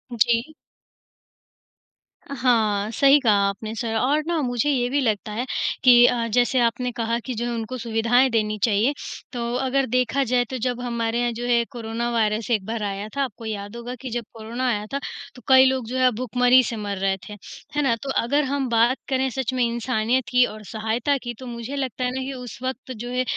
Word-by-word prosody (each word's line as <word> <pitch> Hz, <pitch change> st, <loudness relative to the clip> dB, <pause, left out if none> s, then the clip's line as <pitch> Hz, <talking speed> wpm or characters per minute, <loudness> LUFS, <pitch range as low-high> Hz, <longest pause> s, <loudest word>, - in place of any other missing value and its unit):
जी। 235 Hz, +6 st, +1 dB, 1.7 s
हाँ, 225 Hz, -6 st, +1 dB
सही 275 Hz, +5 st, +5 dB
कहा 225 Hz, -5 st, +4 dB
आपने 210 Hz, +2 st, -4 dB
सर 225 Hz, 0 st, -3 dB
और 280 Hz, +7 st, +2 dB
ना 340 Hz, -1 st, 0 dB
मुझे 245 Hz, +1 st, 0 dB
ये 250 Hz, -4 st, +1 dB
भी 285 Hz, +3 st, +1 dB
लगता 215 Hz, -3 st, -1 dB
है 235 Hz, +4 st, -2 dB, 0.4 s
कि 245 Hz, -2 st, +8 dB
अ, 235 Hz, -1 st, +2 dB
जैसे 245 Hz, +3 st, +2 dB
आपने 245 Hz, +1 st, +1 dB
कहा 230 Hz, -1 st, -1 dB
कि 255 Hz, -, -3 dB
जो 235 Hz, +2 st, -2 dB
है 240 Hz, -, -2 dB
उनको 230 Hz, +2 st, -4 dB
सुविधाएँ 235 Hz, +2 st, +2 dB
देनी 215 Hz, -2 st, 0 dB
चाहिए, 225 Hz, +5 st, +3 dB, 0.4 s
तो 235 Hz, -1 st, -3 dB
अगर 265 Hz, +1 st, +1 dB
देखा 255 Hz, +3 st, +1 dB
जाए 245 Hz, 0 st, +1 dB
तो 260 Hz, -, -3 dB
जब 245 Hz, 0 st, -2 dB
हमारे 235 Hz, -1 st, -1 dB
यहाँ 240 Hz, 0 st, +1 dB
जो 240 Hz, +2 st, -5 dB
है 235 Hz, -1 st, +3 dB
कोरोना 235 Hz, -1 st, -3 dB
वायरस 220 Hz, -1 st, 0 dB
एक 210 Hz, -5 st, +1 dB
बार 225 Hz, 0 st, -3 dB
आया 200 Hz, 0 st, -3 dB
था। 280 Hz, -, +1 dB
आपको 230 Hz, -3 st, -6 dB
याद 205 Hz, 0 st, -5 dB
होगा 240 Hz, +1 st, -6 dB
कि 265 Hz, -, -5 dB
जब 240 Hz, 0 st, -3 dB
कोरोना 230 Hz, +3 st, -4 dB
आया 210 Hz, -3 st, -1 dB
था, 280 Hz, -, 0 dB, 0.4 s
तो 250 Hz, -, -13 dB
कई 260 Hz, 0 st, +7 dB
लोग 260 Hz, -2 st, +1 dB
जो 255 Hz, -, -3 dB
हैं 255 Hz, -1 st, +4 dB
भुखमरी 250 Hz, +2 st, +4 dB
से 235 Hz, -, -3 dB
मर 205 Hz, -2 st, -4 dB
रहे 195 Hz, 0 st, 0 dB
थे, -, -, -7 dB, 0.4 s
है 295 Hz, -, +2 dB
ना? 265 Hz, -5 st, +2 dB
तो 275 Hz, -, -5 dB
अगर 285 Hz, +5 st, +2 dB
हम 275 Hz, 0 st, -1 dB
बात 235 Hz, +3 st, +3 dB
करें 265 Hz, 0 st, +1 dB
सच 260 Hz, +1 st, -3 dB
में 255 Hz, -1 st, +1 dB
इंसानियत 235 Hz, +1 st, 0 dB
की 250 Hz, 0 st, +5 dB
और 215 Hz, -2 st, -8 dB
सहायता 225 Hz, +7 st, -1 dB
की, 240 Hz, -1 st, -4 dB
तो 255 Hz, +3 st, -11 dB
मुझे 235 Hz, +3 st, -6 dB
लगता 260 Hz, -3 st, -3 dB
है 250 Hz, -, 0 dB
ना 265 Hz, -, -2 dB
कि 270 Hz, +1 st, -4 dB
उस 250 Hz, -3 st, -8 dB
वक़्त 260 Hz, 0 st, -4 dB
जो 240 Hz, 0 st, -6 dB
है 250 Hz, 0 st, 0 dB
240 Hz, 215 wpm, -23 LUFS, 225-255 Hz, 1.7 s, कि